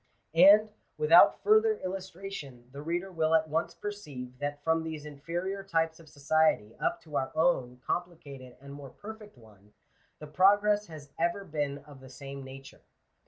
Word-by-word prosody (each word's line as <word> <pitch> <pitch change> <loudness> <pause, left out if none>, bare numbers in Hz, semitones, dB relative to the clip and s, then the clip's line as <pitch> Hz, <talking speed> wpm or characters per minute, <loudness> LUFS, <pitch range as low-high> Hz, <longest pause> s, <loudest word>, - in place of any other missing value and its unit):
And, 205 +5 +7 0.3
without 460 - +6
further 435 0 +4
illustration 185 -9 -7
the 140 +2 -8
reader 175 +5 -3
will 160 -2 +1
at 160 0 +2
once 160 +2 -2
perceive, 145 -12 -8
that 145 0 -4
from 160 +1 +2
these 160 -2 -6
inferior 170 +7 -5
types 165 -3 -1
of 160 -2 -16
society 145 -7 +1
up - - -1
to 150 -3 -5
our 130 - -2
own 130 -7 +1
complicated 140 -8 -5
and 140 +1 -11
more 140 -1 -10
perfect 210 - -11
one, 105 -3 -20 0.4
the 150 - -10
progress 205 +6 +3
has 150 -4 -11
ever 170 +4 0
been 145 -4 -3
of 145 -2 -14
the 130 0 -13
same 135 +1 -9
nature. 135 0 -12
160 Hz, 160 wpm, -29 LUFS, 140-185 Hz, 0.4 s, And